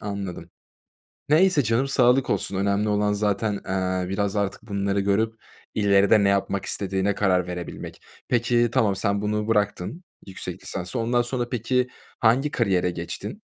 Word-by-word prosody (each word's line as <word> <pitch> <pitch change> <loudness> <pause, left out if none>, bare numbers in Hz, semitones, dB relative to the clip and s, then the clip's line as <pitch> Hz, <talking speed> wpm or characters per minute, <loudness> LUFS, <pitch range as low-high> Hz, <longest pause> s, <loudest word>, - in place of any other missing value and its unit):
anladım. 100 -4 -5 0.8
Neyse 160 -1 +4
canım, 120 +5 +1
sağlık 130 -1 +3
olsun. 100 - -1
Önemli 100 +2 +1
olan 105 0 +1
zaten, 105 +1 0
eee, 95 -1 -2
biraz 100 +1 -1
artık 100 +1 -2
bunları 100 -2 -1
görüp 100 +3 +1 0.4
ileride 100 0 +4
ne 100 - +4
yapmak 100 0 0
istediğine 95 0 -1
karar 90 -3 +1
verebilmek. 90 -1 -7 0.3
Peki, 120 0 +2
tamam, 110 -7 +2
sen 100 0 0
bunu 105 0 -1
bıraktın, 105 - -1 0.2
yüksek 95 -1 -7
lisansı, 90 +5 -4
ondan 120 +2 +2
sonra 120 0 -3
peki 125 +1 0 0.3
hangi 130 +6 +3
kariyere 95 -6 +1
geçtin? 85 0 -6
105 Hz, 140 wpm, -24 LUFS, 95-115 Hz, 0.8 s, Neyse